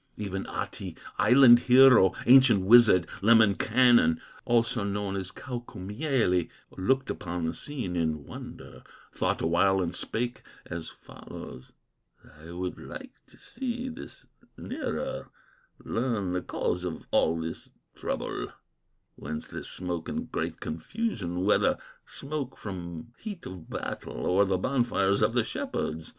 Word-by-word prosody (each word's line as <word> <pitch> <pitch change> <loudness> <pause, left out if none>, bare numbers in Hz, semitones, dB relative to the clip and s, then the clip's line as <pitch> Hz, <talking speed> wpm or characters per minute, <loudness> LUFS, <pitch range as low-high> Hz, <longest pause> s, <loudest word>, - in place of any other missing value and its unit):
Even 95 -2 -4
Ahti, - - -5 0.2
island 120 +2 +7
hero, 125 -6 +7
Ancient 125 -7 +6
wizard, 110 -5 +7 0.2
Lemminkainen, 110 -3 +4 0.3
Also 115 -1 +1
known 100 -1 -2
as 95 -1 -2
Kaukomieli, 120 - -2 0.3
Looked 130 +8 0
upon 90 -1 -4
the 80 - -1
scene 125 -12 -5
in 80 -3 -1
wonder, - - -10 0.3
Thought - - -1
awhile 95 +4 +3
and 90 -1 -1
spake 120 +7 -3 0.2
as 85 -2 -6
follows: 65 - -11 0.7
"I 80 +2 -12
would 90 +1 -5
like - - -9 0.2
to - - -20
see 250 0 -5
this 250 +4 -10 0.3
nearer, - - -4 0.6
Learn 115 -6 -1
the 90 0 -1
cause 90 0 -2
of 90 -3 -5
all 80 +1 +2
this 80 0 -6 0.2
trouble, - - -4 0.7
Whence 80 0 -6
this - - -7
smoke 90 -2 -4
and - - -4
great - - -3
confusion, 90 - -3
Whether 105 - +3 0.3
smoke 140 -2 -5
from 90 +1 -7
heat 205 -6 -7
of 90 -3 -9
battle, - - -5
Or 95 +3 +3
the 95 -1 +1
bonfires 100 -4 +1
of - - +3
the - - +2
shepherds." 80 +1 -4
100 Hz, 125 wpm, -28 LUFS, 90-125 Hz, 0.7 s, island